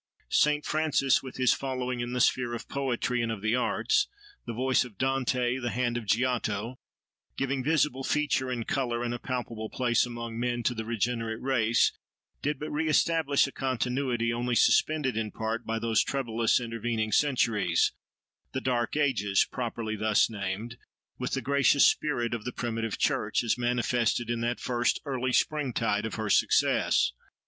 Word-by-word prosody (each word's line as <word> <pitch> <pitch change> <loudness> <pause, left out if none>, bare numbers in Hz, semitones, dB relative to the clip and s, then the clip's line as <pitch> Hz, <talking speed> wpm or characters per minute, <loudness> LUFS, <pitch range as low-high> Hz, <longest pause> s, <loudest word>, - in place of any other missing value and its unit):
Saint 150 0 +2
Francis, 155 -4 +2
with 130 -1 -9
his 130 -2 +4
following 125 -2 -3
in 120 0 -3
the 125 - -2
sphere 120 -1 +2
of 115 - -8
poetry 125 -3 -1
and 115 -1 -1
of 105 -2 -6
the 110 +2 +2
arts—the 410 - -1
voice 130 +3 +2
of 115 -6 -12
Dante, 130 0 0
the 120 -2 -2
hand 120 +2 -1
of 120 -3 -4
Giotto—giving 125 +3 -3
visible 150 -3 +1
feature 145 -2 0
and 120 -3 -3
colour, 120 -3 -1
and 120 0 -2
a 120 - -4
palpable 115 -4 -4
place 120 -2 +1
among 115 -1 -6
men, 120 0 -1
to 125 - +1
the 110 -1 -5
regenerate 115 0 -2
race, 120 -3 +2 0.5
did 145 0 -1
but 150 +3 -6
re 155 +2 -1
establish 155 -2 +3
a 140 - -6
continuity, 125 -2 -1
only 120 +1 -1
suspended 135 +2 +3
in 110 -1 -1
part 110 +2 -4
by 115 0 -1
those 115 -1 +2
troublous 115 -4 +1
intervening 115 -2 -2
centuries—the 115 - -1
"dark 120 +1 -1
ages," 105 -10 +2
properly 115 -3 -4
thus 110 +1 +2
named—with 105 +3 -6
the - - 0
gracious 140 0 +4
spirit 120 -6 +1
of 115 -2 -4
the 125 - -4
primitive 115 -3 -3
church, - - +1
as 115 - +1
manifested 120 -1 0
in 115 -1 -2
that 120 +1 -1
first 120 -2 0
early 130 -2 -1
springtide 120 -7 0
of 105 - -6
her 110 -1 -3
success. - - +3
120 Hz, 155 wpm, -28 LUFS, 115-130 Hz, 0.5 s, his